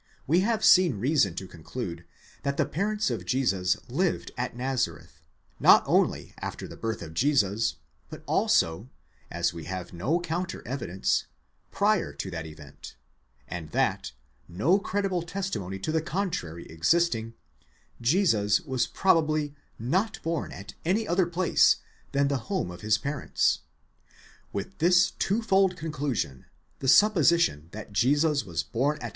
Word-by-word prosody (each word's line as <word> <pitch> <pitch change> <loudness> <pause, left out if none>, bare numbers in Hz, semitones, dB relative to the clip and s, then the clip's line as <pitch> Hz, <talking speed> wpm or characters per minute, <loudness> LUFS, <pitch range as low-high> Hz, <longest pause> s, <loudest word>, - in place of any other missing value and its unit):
We 165 +6 +3
have 220 +3 +1
seen 180 - +6
reason 125 - +2
to 95 +1 -5
conclude 85 0 -7 0.4
that 140 0 -2
the - - +2
parents 205 0 -1
of 110 -6 -3
Jesus 95 -4 +1
lived 170 +8 -1
at 125 -1 -3
Nazareth, 115 - -3 0.4
not - - +7
only - - +1
after - - -5
the - - -10
birth 115 -4 -4
of 80 -1 -9
Jesus, 105 - +2 0.3
but - - -10
also, 85 +9 +1 0.4
as 85 +1 -1
we 85 -2 -8
have 90 0 -6
no 125 - 0
counter 175 +1 -4
evidence, 115 -8 -1 0.4
prior 205 -1 +1
to 95 - -5
that 80 -2 -5
event, 75 -4 -12 0.5
and 85 -1 -6
that, 65 - 0 0.4
no 130 - +2
credible 195 -2 -1
testimony 170 - -4
to 95 +10 -3
the 160 0 +1
contrary 145 - -3
existing, 115 - +1 0.7
Jesus 115 - +3
was 130 -7 -1
probably 155 -5 +2 0.2
not 185 - -1
born 165 -1 -2
at 100 - -9
any 210 +6 +1
other 175 0 +2
place 175 +1 +4 0.4
than 140 0 +2
the 140 -1 0
home 190 - -1
of 85 - -10
his 105 0 +2
parents. 140 - 0 0.9
With 100 +1 -6
this 180 +2 +4
twofold 195 -3 +2
conclusion, 145 - -3 0.3
the 135 - -4
supposition 170 - +4
that 105 +1 -9
Jesus 145 +6 +2
was 85 -5 -3
born 140 +6 0
at. 120 - -5
135 Hz, 140 wpm, -27 LUFS, -, 0.9 s, not